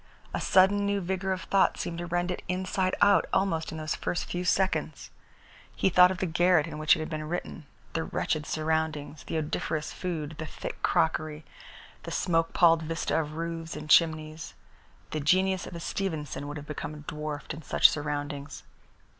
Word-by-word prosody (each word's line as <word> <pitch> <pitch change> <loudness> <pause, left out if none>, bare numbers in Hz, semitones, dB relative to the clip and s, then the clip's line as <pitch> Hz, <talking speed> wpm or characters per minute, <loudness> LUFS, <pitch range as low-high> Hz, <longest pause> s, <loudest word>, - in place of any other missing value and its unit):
A - - -2
sudden 195 +2 +4
new 200 0 +1
vigour 190 +1 -2
of 185 0 -2
thought 195 - +2
seemed 170 0 -4
to 175 - -4
rend 175 +1 0
it - - -4
inside 185 +1 0
out 205 - +5
almost 170 -5 0
in 160 - -6
those 155 0 -2
first 175 - -2
few 175 0 -3
seconds. 190 +1 0 0.6
He - - +2
thought 180 0 +7
of 185 - -3
the 190 - -1
garret 175 -1 +3
in 155 -2 -7
which 155 0 +5
it - - -6
had 155 - -3
been 155 0 -4
written, 170 -3 -5 0.3
the 165 - -1
wretched 155 -1 -2
surroundings, 155 -2 -2
the - - -2
odoriferous 155 0 -2
food, 160 -5 -4
the 160 - -4
thick - - -7
crockery, 155 -1 0 0.6
the - - -7
smoke 165 -2 +1
palled 165 -2 +5
vista 160 0 -1
of 150 -1 -6
roofs 165 0 -4
and 150 0 -5
chimneys. 155 -1 +2 0.6
The 155 - -2
genius 185 +5 +2
of - - -8
a - - -5
Stevenson 160 -6 -3
would 145 +1 -5
have 145 - -8
become 150 0 -6
dwarfed 150 -1 -5
in 155 - -8
such - - +6
surroundings. 145 -2 -4
160 Hz, 180 wpm, -28 LUFS, 155-180 Hz, 0.6 s, thought